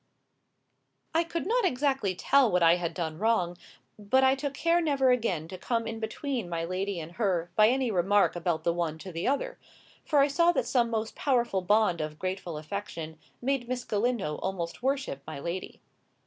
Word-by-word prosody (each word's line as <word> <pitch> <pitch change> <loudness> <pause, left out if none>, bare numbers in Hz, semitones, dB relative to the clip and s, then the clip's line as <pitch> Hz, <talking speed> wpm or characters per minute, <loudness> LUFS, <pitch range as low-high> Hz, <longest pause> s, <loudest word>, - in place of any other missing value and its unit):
I 330 +1 +3
could 335 0 -4
not 475 +5 +2
exactly 270 - +1
tell 265 +4 +3
what 180 -1 +3
I 165 +1 +6
had 170 -2 -3
done 160 -2 -3
wrong; 205 -6 +1 0.4
but 225 +6 +2
I 265 0 +5
took 275 +1 -3
care 335 +4 +2
never 275 -5 +3
again 195 -10 0
to 185 - -8
come 230 +3 -1
in 225 0 -4
between 230 -1 -3
my 165 -1 -2
lady 185 +1 -2
and 160 0 -7
her 180 -6 0
by 215 0 +6
any 255 0 +1
remark 195 +2 +3
about 170 -2 -1
the 170 - +2
one 165 -2 -2
to 185 +4 -9
the 165 +1 -3
other; - - -1 0.4
for 300 - 0
I 280 0 +6
saw 335 +4 +3
that 240 - 0
some 245 -1 +2
most 220 -1 -2
powerful 240 -8 +1
bond 195 -3 +2
of 155 0 -5
grateful 185 -2 -4
affection 160 -2 -6 0.2
made 260 -2 -1
Miss 250 -1 -2
Galindo 210 -8 -1
almost 175 -3 -4
worship 265 - -1
my 155 -3 -6
lady. 170 +5 -5
210 Hz, 190 wpm, -28 LUFS, 175-265 Hz, 0.4 s, I